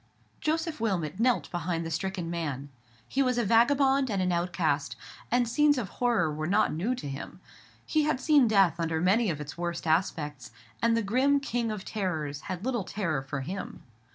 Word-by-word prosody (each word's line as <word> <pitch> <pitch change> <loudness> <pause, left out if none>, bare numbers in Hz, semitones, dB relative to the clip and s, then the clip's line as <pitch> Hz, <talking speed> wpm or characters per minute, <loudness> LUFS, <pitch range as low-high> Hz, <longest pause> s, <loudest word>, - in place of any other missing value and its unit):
Joseph 320 -3 -1
Wilmot 185 -5 -1
knelt 245 +1 +2
beside 170 -1 -2
the 165 - -5
stricken 180 0 -3
man. 145 -5 -3 0.4
He 275 - 0
was 255 -2 +1
a 240 - +1
vagabond 265 +4 +4
and 200 -3 -1
an 185 -1 +1
outcast, 170 -4 0 0.3
and 245 0 +2
scenes 290 +4 +3
of 220 -7 -3
horror 225 -11 +1
were 155 +1 -3
not 205 +4 +2
new 200 +11 -1
to 245 - -7
him. 135 0 -7 0.5
He 310 - +2
had 300 -3 +1
seen 290 -4 +4
death 195 -6 +3
under 165 -1 0
many 200 +6 +3
of 155 -3 -2
its 150 +2 -7
worst 170 -1 -3
aspects, 155 -5 -1 0.3
and 230 0 +3
the 230 - 0
grim 260 +7 +3
King 240 -4 -2
of 210 -2 -6
Terrors 155 -9 -3
had 185 +3 -4
little 245 -5 0
terror 170 -8 -2
for 135 +1 -4
him. 185 +9 -6
190 Hz, 185 wpm, -28 LUFS, 165-245 Hz, 0.5 s, vagabond